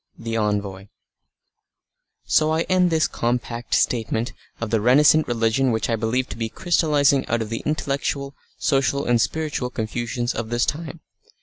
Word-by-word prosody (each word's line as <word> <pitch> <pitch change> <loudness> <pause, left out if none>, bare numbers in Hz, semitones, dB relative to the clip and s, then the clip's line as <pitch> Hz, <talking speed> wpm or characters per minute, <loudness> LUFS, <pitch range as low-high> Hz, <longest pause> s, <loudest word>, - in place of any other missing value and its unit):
THE 115 -1 -4
ENVOY 100 -3 -2 1.4
So 155 0 +3
I 160 +1 +1
end 185 -1 +2
this 160 -3 +2
compact 120 0 -2
statement 115 +1 0 0.3
of 115 -2 -4
the 115 -2 +2
renascent 150 +6 +5
religion 120 +2 +1
which 110 +1 -1
I - - +2
believe 115 +3 -1
to 105 - -7
be 115 -1 -2
crystallising 150 -4 +2
out 120 -1 0
of 110 - -9
the 115 - -3
intellectual, 140 -2 -2 0.2
social, 140 0 +1
and 120 -1 +3
spiritual 150 -4 -2
confusions 120 +1 -3
of 115 0 -4
this 120 0 +1
time. 160 +1 -4
120 Hz, 150 wpm, -22 LUFS, 115-145 Hz, 1.4 s, renascent